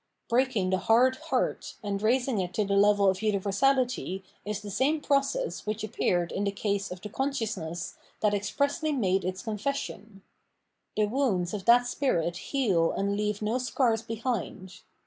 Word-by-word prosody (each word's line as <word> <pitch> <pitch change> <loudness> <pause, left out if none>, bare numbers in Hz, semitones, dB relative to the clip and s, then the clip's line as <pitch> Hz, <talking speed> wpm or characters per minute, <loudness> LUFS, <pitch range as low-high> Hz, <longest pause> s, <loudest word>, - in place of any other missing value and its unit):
Break 260 +2 +2
ing 185 -3 +1
the 185 - +2
hard 250 +6 +4
heart - - -2
and 200 -1 -2
raising 245 +1 +2
it 180 -1 -3
to 210 - +1
the 200 - -1
level 205 0 +5
of 190 +1 +2
uni 215 -2 +2
versality 210 -1 +1 0.2
is 210 0 -3
the 205 - -6
same 275 +9 +2
process 285 - 0
which 215 +1 -2
appeared 175 -4 0
iu 195 - -1
the 200 - +1
case 200 0 -2
of 180 0 -8
the 210 - -6
consciousness 210 - -3 0.2
that 210 -1 +3
expressly 280 - 0
made 195 -7 +1
its 185 +1 -3
confession. 215 -3 -4 0.7
The 215 - +4
woxmds 210 -6 0
of 200 -3 -4
the 240 +1 +7
spirit 245 - 0
heal 195 -12 +1
and 200 +1 0
leave 210 0 -1
no 225 +4 0
scars 245 -2 +1
behind. 225 -5 -4
210 Hz, 165 wpm, -28 LUFS, 195-255 Hz, 0.7 s, the